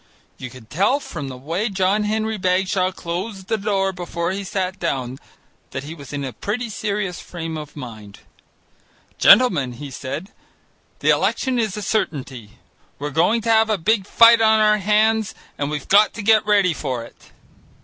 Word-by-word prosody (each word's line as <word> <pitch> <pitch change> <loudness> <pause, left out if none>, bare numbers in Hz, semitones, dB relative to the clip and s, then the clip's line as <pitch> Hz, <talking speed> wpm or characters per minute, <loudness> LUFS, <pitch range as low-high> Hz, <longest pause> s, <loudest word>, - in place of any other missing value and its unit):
You 125 - -6
could 120 -2 -15
tell 200 - +2
from 150 - -7
the 130 -1 -7
way 165 - -2
John 195 +2 +1
Henry 220 0 -1
Bagshaw 185 0 +1
closed 190 +3 -5
the - - +2
door 195 -2 0
before 175 -1 -3
he 200 +1 -4
sat 190 0 -3
down 130 -6 -3 0.5
that 135 - -5
he 150 +3 -7
was 140 -5 -11
in 145 -1 -4
a 130 -2 -5
pretty 235 +3 -4
serious 200 -4 -3
frame 165 -2 -6
of 150 -2 -8
mind. 110 -7 -10 1.0
"Gentlemen," 165 - +5
he 140 +3 -9
said, 140 +9 -6 0.7
"the - - +4
election 260 -2 0
is 215 -3 -1
a 210 - -4
certainty. 135 - -3 0.4
We're 145 +1 -5
going 175 +10 +2
to 230 +1 0
have 220 0 +4
a 215 - +1
big 200 +2 +1
fight 230 0 +6
on 220 0 +4
our 210 0 +4
hands 215 +1 +2 0.2
and 145 0 -3
we've 150 -2 -5
got 210 +2 +4
to 210 - -6
get 215 0 +4
ready 200 -4 +3
for 130 -6 -4
it." 115 - -17
185 Hz, 175 wpm, -21 LUFS, 145-215 Hz, 1.0 s, fight